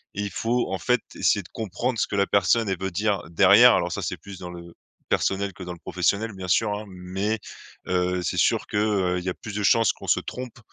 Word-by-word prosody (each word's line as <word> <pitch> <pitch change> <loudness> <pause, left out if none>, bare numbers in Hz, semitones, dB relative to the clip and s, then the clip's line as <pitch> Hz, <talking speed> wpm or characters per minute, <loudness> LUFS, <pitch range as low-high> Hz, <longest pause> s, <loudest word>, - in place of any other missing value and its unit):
et 100 - -2
il 100 - -2
faut 120 +2 -1
en 95 - -2
fait 125 -1 +2 0.2
essayer 100 - +2
de - - -16
comprendre 115 +4 -3
ce - - +1
que 100 - -3
la 100 - +2
personne 100 +3 +2
elle 95 -1 -1
veut 95 0 -3
dire 100 +1 0
derrière. 85 - +7
Alors - - 0
ça - - -3
c'est - - -3
plus 100 -1 -11
dans 90 - -7
le 85 -1 -10 0.3
personnel 100 0 0
que 90 - -9
dans 90 - -6
le 85 - -13
professionnel 100 +6 -1
bien 95 -1 -7
sûr 105 +4 +2
hein, 105 - -6
mais, 95 +4 -3 0.5
heu, 90 0 0
c'est 90 - -2
sûr - - +2
que, - - -3
heu, 100 -4 +1
il - - -8
y 95 - -2
a - - -2
plus 105 0 -9
de 105 - -2
chances 115 +1 +4
qu'on - - -12
se - - +3
trompe 125 -2 -7
100 Hz, 250 wpm, -25 LUFS, 90-110 Hz, 0.5 s, derrière